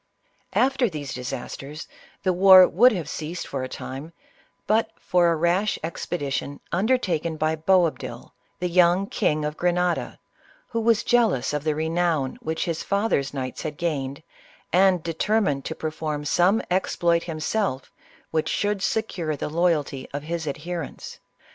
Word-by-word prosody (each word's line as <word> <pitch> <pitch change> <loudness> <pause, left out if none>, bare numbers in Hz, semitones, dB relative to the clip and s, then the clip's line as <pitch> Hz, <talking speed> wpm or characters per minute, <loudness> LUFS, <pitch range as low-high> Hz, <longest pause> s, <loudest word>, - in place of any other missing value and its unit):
After 265 -2 +3
these 145 -5 -6
disasters, 135 +4 -6 0.4
the 185 - +2
war 185 0 +8
would 245 +8 +5
have 175 -8 -3
ceased 165 +3 -5
for 135 - -4
a 130 - -4
time, 140 +6 -7 0.5
but 220 +3 +2
for 175 -2 +2
a 165 - +2
rash 175 +6 +1
expedition 145 -4 -3
undertaken 175 -6 0
by 155 0 +1
Boab 170 +1 +2
dil, - - -8 0.2
the 180 - -1
young 180 +2 +4
King 155 -5 0
of 150 0 -4
Grenada, 180 0 0 0.5
who 230 -1 -1
was 225 -1 +3
jealous 225 - +2
of 150 -1 -2
the 155 -1 0
renown 160 -3 0
which 160 +1 -2
his 165 -2 -2
fathers 200 -9 0
knights 130 -2 -5
had 150 -2 -5
gained, 145 -4 -3 0.5
and 185 -2 +4
de 165 - -3
termined 175 -6 +1
to 160 - -4
perform 155 -1 -4
some 180 +8 +3
exploit 170 -2 +2
himself 160 -2 -2 0.4
which 155 -1 0
should 205 -1 0
secure 180 -8 -1
the 145 - -4
loyalty 155 -5 0
of 145 - -4
his 165 0 -4
adherents. 165 +2 -5
170 Hz, 150 wpm, -24 LUFS, 150-185 Hz, 0.5 s, war